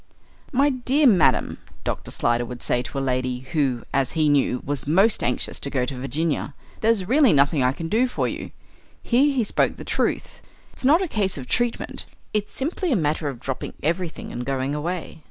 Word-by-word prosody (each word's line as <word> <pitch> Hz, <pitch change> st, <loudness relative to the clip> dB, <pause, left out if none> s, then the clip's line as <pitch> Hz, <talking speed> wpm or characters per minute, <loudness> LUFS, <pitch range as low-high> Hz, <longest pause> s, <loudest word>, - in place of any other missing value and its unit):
"My 280 Hz, +2 st, +3 dB
dear 260 Hz, +3 st, +2 dB
madam," 195 Hz, -, +4 dB, 0.2 s
Dr. -, -, -3 dB
Slyder 120 Hz, 0 st, +1 dB
would 120 Hz, 0 st, -8 dB
say 120 Hz, -, +1 dB
to 135 Hz, -, -7 dB
a -, -, +1 dB
lady 130 Hz, -1 st, -1 dB
who, 130 Hz, -3 st, -1 dB
as 135 Hz, -2 st, +1 dB
he 155 Hz, -2 st, +2 dB
knew, 140 Hz, -3 st, +2 dB
was 140 Hz, 0 st, -3 dB
most 195 Hz, +8 st, +4 dB
anxious 125 Hz, -, -1 dB
to 140 Hz, -, -4 dB
go 130 Hz, -3 st, 0 dB
to 130 Hz, 0 st, -5 dB
Virginia, 145 Hz, +2 st, -2 dB, 0.2 s
"there's 220 Hz, -4 st, +2 dB
really 270 Hz, +1 st, +5 dB
nothing 140 Hz, +1 st, +3 dB
I 125 Hz, 0 st, +3 dB
can 165 Hz, +4 st, -5 dB
do 230 Hz, +8 st, +2 dB
for 245 Hz, -, -1 dB
you." -, -, -5 dB, 0.5 s
Here 270 Hz, +5 st, +3 dB
he 260 Hz, -4 st, +1 dB
spoke -, -, +1 dB
the -, -, -7 dB
truth. -, -, -2 dB, 0.3 s
"It's -, -, -15 dB
not 310 Hz, +8 st, +5 dB
a -, -, -2 dB
case 200 Hz, -, 0 dB
of 130 Hz, -, -6 dB
treatment. 240 Hz, 0 st, -1 dB, 0.3 s
It's 210 Hz, -1 st, -1 dB
simply 325 Hz, +5 st, -2 dB
a -, -, +4 dB
matter 155 Hz, -3 st, 0 dB
of 135 Hz, -4 st, -4 dB
dropping 130 Hz, +1 st, -5 dB
everything 170 Hz, +2 st, -2 dB
and 120 Hz, -, -4 dB
going 135 Hz, +1 st, -1 dB
away. 165 Hz, +3 st, -4 dB
155 Hz, 195 wpm, -23 LUFS, -, 0.5 s, really